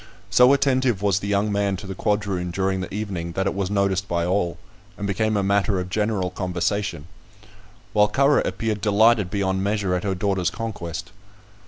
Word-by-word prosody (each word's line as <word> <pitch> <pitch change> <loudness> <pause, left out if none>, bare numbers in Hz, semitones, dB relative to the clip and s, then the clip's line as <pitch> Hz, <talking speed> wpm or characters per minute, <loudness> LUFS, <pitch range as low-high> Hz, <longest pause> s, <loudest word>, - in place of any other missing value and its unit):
So 125 +1 +6
attentive 130 -6 +2
was 100 -1 +2
the 100 - -5
young 100 +1 +1
man 100 -1 0
to 90 - -9
the 95 - -5
quadroon 100 -3 -1
during 95 +1 -1
the 90 - -6
evening 95 -5 -4
that 95 - -1
it 100 - 0
was 95 -1 -2
noticed 100 -1 0
by 85 -1 0
all, 90 -1 0 0.4
and 100 - -4
became 110 +2 0
a 100 - +1
matter 100 0 +1
of 90 0 -5
general 105 -3 0
conversation; 90 -2 -2 0.9
while 105 -1 +5
Currer 140 +5 +3
appeared 110 -3 -2
delighted 105 0 +4
beyond 95 -1 -1
measure 100 -2 0
at 90 - -1
her 95 -2 -1
daughter's 95 -1 0
conquest. 100 -8 -6
100 Hz, 180 wpm, -23 LUFS, 95-105 Hz, 0.9 s, So